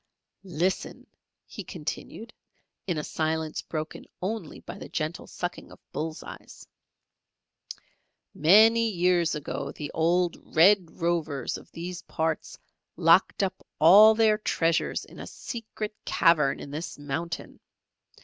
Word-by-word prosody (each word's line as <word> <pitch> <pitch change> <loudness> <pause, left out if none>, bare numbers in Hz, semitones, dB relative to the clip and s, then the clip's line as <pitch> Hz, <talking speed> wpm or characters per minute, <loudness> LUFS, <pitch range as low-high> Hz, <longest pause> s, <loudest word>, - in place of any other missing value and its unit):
"Listen," 185 +1 -2 0.4
he - - -8
continued, - - -7 0.5
in 175 -4 -1
a 150 - -2
silence 160 0 -2
broken 155 -1 -6 0.2
only 195 -3 -4
by - - -9
the - - -9
gentle 155 +2 -4
sucking 175 0 -6
of - - -13
bull's 155 0 -4
eyes. - - -12 1.7
"Many 225 +8 +5
years 175 -4 +2
ago 150 -1 -4
the 150 - -7
old 170 +2 0
Red 180 +1 +4
Rovers 160 -6 -1
of - - -11
these 175 +1 -6
parts 160 -1 -3 0.4
locked 170 +4 +4
up 190 -1 -3
all 205 +7 +8
their 215 -1 +3
treasures 165 -5 0
in - - -14
a - - -7
secret 220 -3 -6
cavern 155 -5 +3
in 140 - -8
this 155 +4 -5
mountain. 160 +4 -5
170 Hz, 120 wpm, -27 LUFS, 160-190 Hz, 1.7 s, all